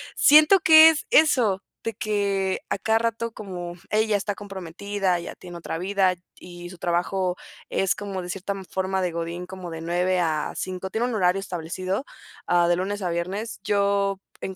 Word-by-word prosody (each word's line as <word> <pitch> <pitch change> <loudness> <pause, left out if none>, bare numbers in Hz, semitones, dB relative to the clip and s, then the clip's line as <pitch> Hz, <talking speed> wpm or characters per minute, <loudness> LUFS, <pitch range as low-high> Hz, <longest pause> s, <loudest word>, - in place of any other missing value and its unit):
siento 305 +6 +7
que 320 -3 +9
es 315 - -1
eso 240 -11 +4 0.2
de 225 - -3
que 200 -4 -1
a - - 0
cada 220 +2 +1
rato 230 0 -2
como 180 -5 -7 0.2
ella 215 0 +2
está 205 0 -2
comprometida, 195 -1 -3
ya 170 - -7
tiene 175 -1 -10
otra 165 -1 -5
vida 190 -1 +1
t 175 - -33 0.2
y 175 -1 -9
su 180 - -12
trabajo 180 +1 0 0.3
es 195 - +1
como 195 -2 -5
de 175 - -8
cierta 195 +2 -3 0.2
forma 190 0 -1
de 180 - -1
Godín, 170 +2 -4
como 185 -2 -8
de 165 0 -6
9 180 +2 0
a 155 -3 -1
5, 185 0 -4
Tiene 225 +5 -1
un 245 - -3
horario 185 -1 +2
establecido, 185 - -4 0.4
ah, 175 -1 +3
de 175 - +3
lunes 195 +3 -3
a 180 - -1
viernes. 190 +7 -4
Yo, 200 -1 +1 0.2
en 190 - -4
190 Hz, 180 wpm, -24 LUFS, 175-205 Hz, 0.4 s, que